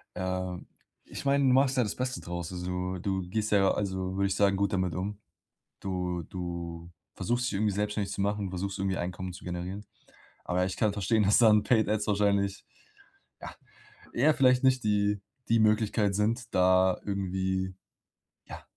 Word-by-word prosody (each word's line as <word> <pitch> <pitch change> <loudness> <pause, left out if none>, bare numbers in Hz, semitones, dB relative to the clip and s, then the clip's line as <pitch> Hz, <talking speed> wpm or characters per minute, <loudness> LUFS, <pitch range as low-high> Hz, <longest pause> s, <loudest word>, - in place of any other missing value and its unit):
Ähm, 90 0 -3 0.4
ich - - -8
meine, 140 0 +3
du 130 - +5
machst 135 +1 +3
ja 125 - +4
das 105 - -3
Beste 125 -7 -3
draus. 85 0 -5
also, 90 +1 -3
du 95 0 -1
du 90 - -9
gehst 110 +2 -1
ja, 100 -2 +4
also, 95 -2 -2
würde 100 0 +1
ich 95 - -1
sagen, 100 -1 +3
gut 100 0 0
damit 95 -2 0
um. 100 +3 -4 0.6
Du 90 -2 -3
du 85 -1 -6 0.2
versuchst, 120 +6 -1
dich 125 - -2
irgendwie 105 +1 +1
selbstständig 105 0 -2
zu 100 - -4
machen, 100 0 0
versuchst 95 +2 -4
irgendwie 95 -1 -1
Einkommen 90 +1 -4
zu 90 - -12
generieren, 90 +3 -5 0.6
aber 90 +1 0
ich 95 0 -3
kann 105 -2 +1
verstehen, 105 +2 +1
dass 100 +1 +4
dann 105 -3 +6
Paid 110 -5 +2
Ads 105 0 0
wahrscheinlich, 100 -1 +1 0.8
ja, - - -8 0.6
eher 150 +6 +3
vielleicht 130 -2 +4
nicht 130 -2 +3
die 105 -1 +1 0.3
die 115 - +4
Möglichkeit 110 -1 +2
sind, 115 +4 -1
da 95 0 +4
irgendwie, 95 -1 -2 0.7
ja, - - -9
100 Hz, 175 wpm, -29 LUFS, 95-105 Hz, 0.8 s, dann